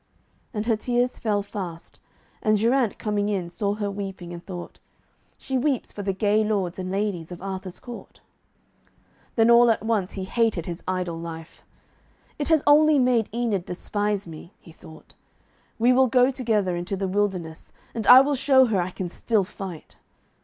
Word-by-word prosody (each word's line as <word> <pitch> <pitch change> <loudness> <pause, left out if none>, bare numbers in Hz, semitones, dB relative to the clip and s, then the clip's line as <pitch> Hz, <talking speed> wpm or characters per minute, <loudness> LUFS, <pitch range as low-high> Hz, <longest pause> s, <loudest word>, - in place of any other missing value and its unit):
And 210 -2 -3
her 230 -1 +2
tears 245 +2 -1
fell 205 -3 0
fast, 185 -5 -8 0.4
and 215 0 +3
Geraint 235 +1 +1
coming 210 -1 -1
in, 185 -4 -2
saw 205 +2 -1
her 205 -1 -3
weeping, 195 -3 -6
and 170 0 -9
thought, 175 -2 -8 0.6
'She 265 -1 -2
weeps 265 -1 -1
for 205 - -7
the 195 -1 -1
gay 205 +3 +2
lords 195 -4 -1
and 185 0 -4
ladies 190 -4 -2
of 175 - -7
Arthur's 190 -1 -6
court.' 245 -1 -11 1.2
Then 225 0 +4
all 235 0 +7
at 220 -1 +1
once 210 -4 0
he 190 - -5
hated 210 -4 0
his 170 -1 -6
idle 180 -3 -2
life. 165 -1 -9 0.8
'It 290 - -1
has 320 -3 +3
only 300 +1 +6
made 250 -4 +2
Enid 220 -5 -1
despise 205 +2 -2
me,' 165 +3 -11
he 165 - -15
thought. 160 0 -15 0.6
'We 240 +3 +4
will 260 +1 +4
go 250 +2 +4
together 220 -8 0
into 175 +3 -3
the 195 0 -2
wilderness, 185 -5 -2 0.2
and 225 -2 -4
I 255 +1 +10
will 285 +2 +1
show 265 -1 +5
her 210 -6 +1
I 175 - -2
can 185 0 -5
still 210 +4 0
fight.' 185 -3 -9
205 Hz, 175 wpm, -24 LUFS, 185-235 Hz, 1.2 s, I